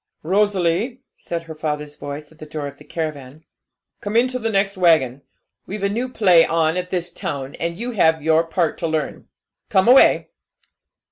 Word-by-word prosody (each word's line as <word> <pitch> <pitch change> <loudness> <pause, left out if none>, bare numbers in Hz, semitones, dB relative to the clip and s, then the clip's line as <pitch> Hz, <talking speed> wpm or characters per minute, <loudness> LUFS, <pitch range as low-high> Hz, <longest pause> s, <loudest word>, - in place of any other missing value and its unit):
'Rosalie,' 200 +6 +1 0.2
said 170 -1 -4
her 165 -1 -9
father's 150 -1 -4
voice, 145 +1 -8
at 160 - -21
the 155 - -8
door 150 -1 -5
of 140 - -8
the - - -13
caravan, 155 -2 -6 0.5
'come 205 +2 -5
into 255 +2 +2
the 225 -1 -1
next 195 -1 +1
waggon. 155 -8 +3 0.5
We've 200 +1 -5
a 200 - +2
new 240 +5 -2
play 185 -9 +5
on 165 0 +1
at 180 0 -3
this 175 -1 -3
town, 140 -4 -5
and 170 0 -3
you 240 +2 -4
have 160 -8 +2
your 160 +1 +3
part 165 -1 -1
to 165 - -1
learn. 155 -2 -3 0.4
Come 190 +2 +3
away!' 255 +2 +6
165 Hz, 180 wpm, -21 LUFS, 155-200 Hz, 0.5 s, away